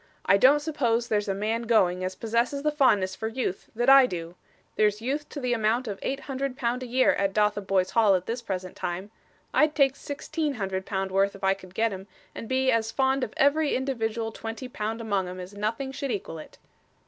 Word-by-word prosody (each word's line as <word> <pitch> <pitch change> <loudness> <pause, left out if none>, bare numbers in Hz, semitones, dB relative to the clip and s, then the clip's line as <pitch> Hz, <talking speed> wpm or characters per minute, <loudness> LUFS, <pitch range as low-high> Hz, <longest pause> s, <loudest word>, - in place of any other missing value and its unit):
'I 195 - +5
don't 270 +8 +6
suppose 240 -7 0
there's 210 -2 0
a 195 - -1
man 220 +3 -1
going, 185 -5 +3
as 185 0 -3
possesses 235 +7 -1
the 300 - +2
fondness 205 -10 +2
for 220 - -4
youth 225 -5 -3
that 240 +2 0
I 270 -1 +8
do. 170 -4 -6 0.4
There's 210 -1 +2
youth 280 +6 -3
to 290 - -6
the 250 -2 0
amount 230 +2 +1
of 200 -2 -5
eight 275 +1 -3
hundred 270 -1 -4
pound 245 -1 -1
a 255 - -5
year 255 +2 +3
at 195 -1 -1
Dotheboys 200 -3 +1
Hall 215 -4 +4
at 180 0 -2
this 235 +2 -3
present 185 -5 -5
time. 180 +4 -4 0.4
I'd 305 -1 +3
take 275 -2 +3
sixteen 295 +1 -3
hundred 190 -3 -3
pound 190 -1 -2
worth 195 +1 +2
if 195 - -13
I 195 0 +4
could 185 -1 -14
get 225 -1 +1
'em, 190 +1 -8 0.3
and 225 - -8
be 260 0 +2
as 225 -1 0
fond 265 0 +1
of 215 - -5
every 285 +2 +3
individual 230 -4 -2
twenty 225 +3 -6
pound 225 -1 -4
among 200 -4 -1
'em 180 +1 -7
as 180 +2 -8
nothing 225 +6 -3
should 275 +1 -4
equal 190 -7 -4
it! - - -12
225 Hz, 215 wpm, -26 LUFS, 195-260 Hz, 0.4 s, I